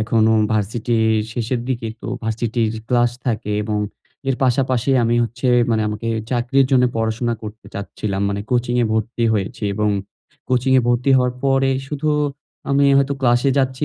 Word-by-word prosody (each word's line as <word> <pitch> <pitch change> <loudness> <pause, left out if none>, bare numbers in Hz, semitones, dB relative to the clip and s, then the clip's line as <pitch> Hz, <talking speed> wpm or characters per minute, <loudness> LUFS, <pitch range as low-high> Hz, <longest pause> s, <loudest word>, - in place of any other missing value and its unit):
এখনো 110 0 +2 0.2
ভার্সিটির 110 +2 0 0.2
শেষের 120 +1 -2
দিকে। 120 -3 -2
তো - - -8 0.2
ভার্সিটির 110 0 -1 0.2
ক্লাস 120 -1 +3 0.2
থাকে 110 -3 -1
এবং 105 -1 -1 0.5
এর 130 - +1
পাশাপাশি 130 0 +1
আমি 115 +1 +2
হচ্ছে 115 +3 -4 0.2
মানে 110 -1 +2
আমাকে 105 +2 -4 0.2
চাকরির 125 +2 +2
জন্য 125 -2 +4
পড়াশোনা 115 +1 -1
করতে 110 +1 -9
চাচ্ছিলাম। 100 0 -3
মানে 100 0 -2
কোচিং 120 -1 +1
এ - - +2
ভর্তি 110 +2 -1
হয়েছি 105 +2 -2
এবং 105 +1 +1 0.6
কোচিং 130 +1 +2
এ - - +5
ভর্তি 120 +3 +2
হওয়ার 125 -1 +2
পরে 135 0 +3 0.2
শুধু 150 +2 -2 0.6
আমি 140 +1 +3
হয়তো 140 0 +2
ক্লাসে 120 +1 +3
যাচ্ছি, 130 +1 0
120 Hz, 155 wpm, -20 LUFS, 110-130 Hz, 0.6 s, এ